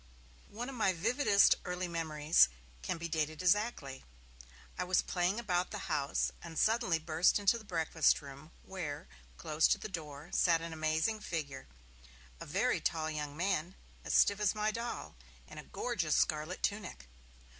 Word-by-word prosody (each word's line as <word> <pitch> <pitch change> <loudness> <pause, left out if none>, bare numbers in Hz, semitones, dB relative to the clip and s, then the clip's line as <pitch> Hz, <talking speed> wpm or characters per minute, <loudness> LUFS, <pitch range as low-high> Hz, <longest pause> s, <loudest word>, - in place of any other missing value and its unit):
One 235 +4 -6
of 270 - -6
my 215 -6 +1
vividest 205 - +4
early 180 0 -3
memories 160 - +3 0.3
can 65 - -3
be 170 0 -4
dated 155 0 -2
exactly. 180 - 0 0.7
I - - -2
was 180 0 +2
playing 180 +4 0
about 180 -5 0
the - - -6
house, 140 -2 0
and 165 -2 -9
suddenly 220 -6 +2
burst 160 +2 +2
into 205 +3 +2
the - - -13
breakfast 165 -4 +2
room, 140 +2 -11
where, 155 -7 -6 0.3
close 155 +1 +2
to - - +2
the - - -6
door, 155 -4 -8
sat 170 -2 +4
an 165 0 -6
amazing 160 +7 0
figure, 150 -9 -5 0.7
a - - -8
very - - +1
tall 160 -1 -1
young 150 -1 -5
man, 185 0 -1 0.3
as - - -1
stiff 200 0 +4
as 210 0 +1
my 215 0 0
doll, 235 +2 -5 0.3
in - - -10
a - - -8
gorgeous 185 -11 -1
scarlet 155 +4 0
tunic. 200 - -3
170 Hz, 160 wpm, -33 LUFS, 155-200 Hz, 0.7 s, vividest